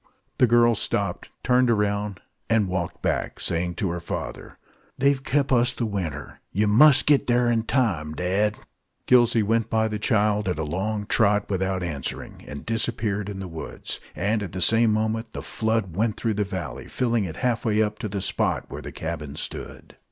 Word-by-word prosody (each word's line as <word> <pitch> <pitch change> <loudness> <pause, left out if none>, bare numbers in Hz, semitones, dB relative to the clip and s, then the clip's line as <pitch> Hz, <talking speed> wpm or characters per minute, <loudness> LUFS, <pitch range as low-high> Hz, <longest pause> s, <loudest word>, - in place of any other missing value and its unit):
The 125 - +6
girl 120 0 +5
stopped, 110 - -2
turned 125 0 +3
round, 105 -2 0 0.3
and 110 -3 +3
walked 90 -2 -3
back, - - -1
saying 85 +1 -1
to 100 -6 -1
her 85 - -3
father, - - -6 0.4
"They've 140 0 +2
kep' 140 0 +1
us 125 -1 +3
the 120 - -2
winter. 85 -9 -4
Yer 105 +3 +1
must 130 +6 +6
git 145 -2 +3
thar 120 -1 +3
in 115 -1 +2
time, 95 - 0
dad!" 100 +5 0 0.5
Gillsey 120 -3 +5
went 115 +1 +1
by 110 0 +2
the 105 -1 -3
child, 105 -2 +2
at 90 - -1
a 80 - -1
long 100 +7 -2
trot, 105 -1 +2
without 95 -1 -1
answering, 75 -6 -5
and 70 0 -8
disappeared 110 -3 -1
in 100 - -6
the 95 - -5
woods; 80 -2 -6 0.2
and 105 +4 0
at 95 -4 -6
the 90 - -3
same 115 +3 +5
moment 110 +1 -1
the - - -6
flood 110 -6 -1
went 110 +2 0
through 115 -2 0
the 105 0 0
valley, 75 - -6
filling 120 -4 0
it 80 -3 -6
half 120 +4 0
way 110 -1 +2
up 105 0 -3
to 110 -3 -4
the 100 0 -3
spot - - 0
where - - -7
the - - -7
cabin 80 -3 -5
stood. - - -7
105 Hz, 190 wpm, -25 LUFS, 95-115 Hz, 0.5 s, The